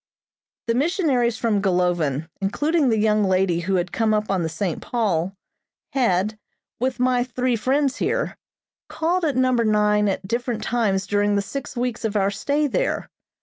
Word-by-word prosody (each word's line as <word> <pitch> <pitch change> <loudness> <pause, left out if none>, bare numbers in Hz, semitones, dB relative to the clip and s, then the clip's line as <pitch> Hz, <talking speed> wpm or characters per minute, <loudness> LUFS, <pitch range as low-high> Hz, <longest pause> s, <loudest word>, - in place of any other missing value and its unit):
The 230 - +1
missionaries 265 - +1
from 220 -3 +1
Golovin, 175 -6 +1
including 290 +9 +1
the 225 - +2
young 215 0 +2
lady 185 -2 +2
who 190 +3 -1
had 180 0 -1
come 220 -1 +1
up 210 -1 -1
on 190 -2 +1
the 165 - -1
"St. 160 +1 -3
Paul," 195 -6 -1 0.6
had, 215 -4 +1 0.4
with 255 +1 -1
my 250 -1 +2
three 250 0 -1
friends 270 +4 +1
here, - - -1 0.5
called 345 +3 0
at 290 -5 0
Number 255 -2 +3
Nine 210 -1 +3
at 190 0 -3
different 235 +1 -2
times 205 -5 0
during 205 0 +1
the 200 - +2
six 250 +5 -6
weeks 240 -1 -2
of 220 -1 -2
our 200 -1 +2
stay 285 +9 0
there. 285 - -1
215 Hz, 165 wpm, -23 LUFS, 195-255 Hz, 0.6 s, Number